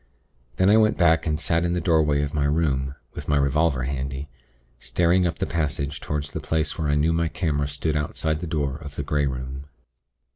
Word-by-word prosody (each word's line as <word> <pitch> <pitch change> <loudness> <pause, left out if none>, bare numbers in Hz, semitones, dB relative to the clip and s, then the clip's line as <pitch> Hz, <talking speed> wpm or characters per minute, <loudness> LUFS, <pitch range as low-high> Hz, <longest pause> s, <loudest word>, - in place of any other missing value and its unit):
Then 95 +9 +4
I 110 - +6
went 110 -1 +3
back, 80 -1 +3
and 75 -1 0
sat 85 +2 +1
in 85 0 0
the 90 - 0
doorway 80 -4 +2
of 75 - -3
my 75 -2 +1
room, 70 -3 0 0.2
with - - -7
my 75 - +3
revolver 70 -1 +2
handy, 70 +1 -4 0.5
staring 90 +6 +2
up 85 - -3
the - - -1
passage 75 -3 -2
toward 75 -1 -2
the 70 - -5
place 80 -2 -1
where 80 - -2
I 75 - +2
knew 80 +3 +2
my 85 0 +1
camera 75 -4 -1
stood 75 +2 -2
outside 75 +1 -1
the 85 - -5
door 70 -4 -1
of 75 -2 -10
the 70 - -3
Grey 70 0 0
Room. 65 +1 -5
75 Hz, 210 wpm, -24 LUFS, 70-80 Hz, 0.5 s, I